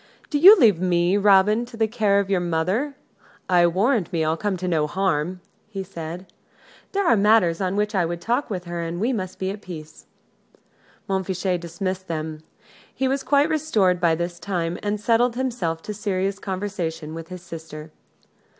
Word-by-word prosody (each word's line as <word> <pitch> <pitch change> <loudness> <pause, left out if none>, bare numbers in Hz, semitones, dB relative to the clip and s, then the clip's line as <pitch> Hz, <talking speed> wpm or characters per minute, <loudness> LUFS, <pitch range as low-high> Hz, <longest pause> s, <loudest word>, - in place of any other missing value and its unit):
"Do 290 - +1
you 390 +7 +10
leave 210 - +5
me, 175 0 +2
Robin, 205 +2 +4
to 235 -1 -11
the 220 -1 +2
care 210 -3 +2
of 200 - -1
your 195 -2 +1
mother: 180 - -1 0.5
I 175 -1 +4
warrant 200 +3 +1
me 165 -3 0
I'll 160 +1 +1
come 200 +1 -2
to 180 +1 -4
no 155 -4 +1
harm!" 180 0 -1 0.3
he 195 -3 -5
said. 170 -1 -7 0.7
"There 400 -1 0
are 240 - +5
matters 205 -4 +3
on 185 0 -1
which 210 +1 0
I 190 -3 +2
would 170 0 -3
talk 240 +9 -1
with 185 -4 -4
her, 175 -1 -5
and 170 +1 -4
we 235 +6 +1
must 185 -5 -4
be 190 0 -2
at 205 +1 -8
peace." 160 -5 -10 1.0
Montfichet 190 -2 -1
dismissed 185 +2 -4
them. 155 -1 -4 0.5
He 265 - -1
was 270 +1 0
quite 285 +2 +3
restored 215 - +1
by 165 -2 +3
this 175 +1 -4
time, 175 -2 -3
and 205 0 -2
settled 235 +2 +2
himself 230 -11 -2
to - - -5
a - - -4
serious 195 -1 -2
conversation 185 -6 -4
with 165 0 -7
his 180 -1 -9
sister. 160 -2 -9
185 Hz, 185 wpm, -23 LUFS, 170-210 Hz, 1.0 s, you